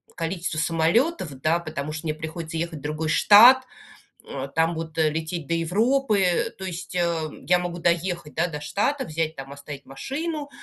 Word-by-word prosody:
количество 165 -1 -3
самолетов, 170 - +1
да, 165 +2 +2
потому 155 -3 -5
что 160 +1 -5
мне 155 - -1
приходится 160 +1 -6
ехать 165 -2 -3
в - - -16
другой 155 +1 -3
штат, 240 +10 +8 0.7
э, 135 0 -5
там 165 +1 +2
вот 160 -1 -6
лететь 160 0 -1
до 170 - 0
Европы, 200 +1 +1
то - - -7
есть, 180 0 -6
э, 170 -3 0 0.2
я 180 0 +5
могу 175 -1 -4
доехать, 170 -2 -1
да, 170 +2 +2
до 150 -3 -6
штата, 265 - -1
взять, 160 -1 -2
там 135 +1 -8
оставить 140 0 -9
машину, 290 - -4
165 Hz, 170 wpm, -24 LUFS, 155-185 Hz, 0.7 s, штат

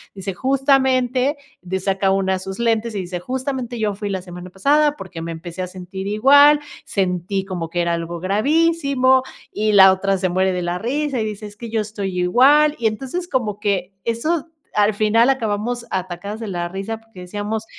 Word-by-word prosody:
dice 195 0 -5
justamente 265 +1 +2 0.2
de 185 +1 -3
saca 195 0 +1
una 190 0 +1
de 190 - -1
sus 190 +2 -7
lentes 230 -1 0
y - - -1
dice: 180 0 -5
"Justamente 255 +2 -4
yo 210 -2 0
fui 205 +1 -4
la 190 -2 -2
semana 180 0 -9
pasada 290 +10 +2
porque 165 - -8
me 165 +1 -5
empecé 170 +2 -7
a 180 - -3
sentir 185 +1 -7
igual, 285 +8 +6 0.3
sentí 190 0 -1
como 175 -4 -4
que 175 +1 -1
era 170 0 0
algo 170 0 -4
gravísimo" 265 - +2 0.3
y 215 0 0
la 190 -1 +9
otra 195 +1 0
se 185 0 0
muere 190 +2 +1
de 180 - -2
la 175 0 -2
risa 275 +4 -1
y - - -1
dice: 210 0 -6
"Es 205 0 -10
que 235 +1 -7
yo 220 0 0
estoy 205 -3 -4
igual" 280 +11 +5
y 230 - +2
entonces 265 +11 -4
como 225 - -2
que 195 -3 -1
eso 305 +8 -1 0.2
al 210 +1 +3
final 220 +4 +3
acabamos 235 0 -2
atacadas 185 +3 -4
de 230 - -5
la 175 -3 -3
risa 195 +5 -4
porque 225 -4 -14
decíamos 205 +4 -4
210 Hz, 190 wpm, -20 LUFS, 185-255 Hz, 0.3 s, la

